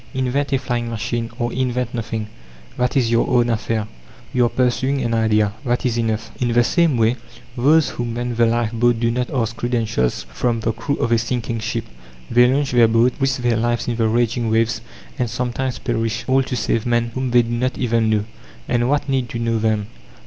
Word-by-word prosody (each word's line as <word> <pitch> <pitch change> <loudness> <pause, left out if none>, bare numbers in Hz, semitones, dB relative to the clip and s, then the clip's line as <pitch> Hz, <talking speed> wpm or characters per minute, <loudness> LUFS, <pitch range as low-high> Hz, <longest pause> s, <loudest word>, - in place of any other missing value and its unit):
Invent 130 +2 0
a 135 - +3
flying 120 -2 -2
machine, 115 +1 -3
or 120 -2 -2
invent 125 -1 -1
nothing 110 -2 -3 0.5
that 125 +1 0
is 120 -3 +2
your 115 - +2
own 120 -2 +3
affair. 110 -1 -1 0.5
You 125 -1 +3
are - - +1
pursuing 130 +2 0
an 115 -1 -1
idea 110 -2 +2
that 120 0 -1
is 120 -2 +1
enough. 110 -1 -2
In 120 -1 +1
the 120 +1 +5
same 165 0 +2
way, 115 +2 +2 0.4
those 145 +5 +4
who 120 - -4
man 120 +1 -3
the 115 0 +3
lifeboat 115 0 +1
do 115 0 +1
not 125 +1 -1
ask 115 -3 -1
credentials 115 - -1
from 115 -2 0
the 115 - 0
crew 120 +5 -2
of 115 - -1
a 115 - +4
sinking 115 -1 -2
ship; 115 +1 -3 0.5
they 125 +1 +5
launch 140 +1 0
their 120 -2 +5
boat, 115 +2 +3
risk 135 -2 0
their 120 -2 +2
lives 120 +1 0
in 120 - 0
the 115 -1 +1
raging 115 0 +1
waves, 115 +1 +1 0.4
and 120 -2 0
sometimes 125 +1 -2
perish, 115 0 -2
all 135 +1 +4
to 130 -1 -3
save 115 0 -1
men 120 -1 +1
whom 130 0 -2
they 120 0 +5
do 115 - -5
not 125 +2 -1
even 115 -2 +1
know. 105 -1 +1 0.4
And 120 0 +1
what 145 +1 +1
need 130 -3 0
to - - -4
know 115 -1 0
them? 110 -1 0
120 Hz, 205 wpm, -20 LUFS, 115-125 Hz, 0.5 s, the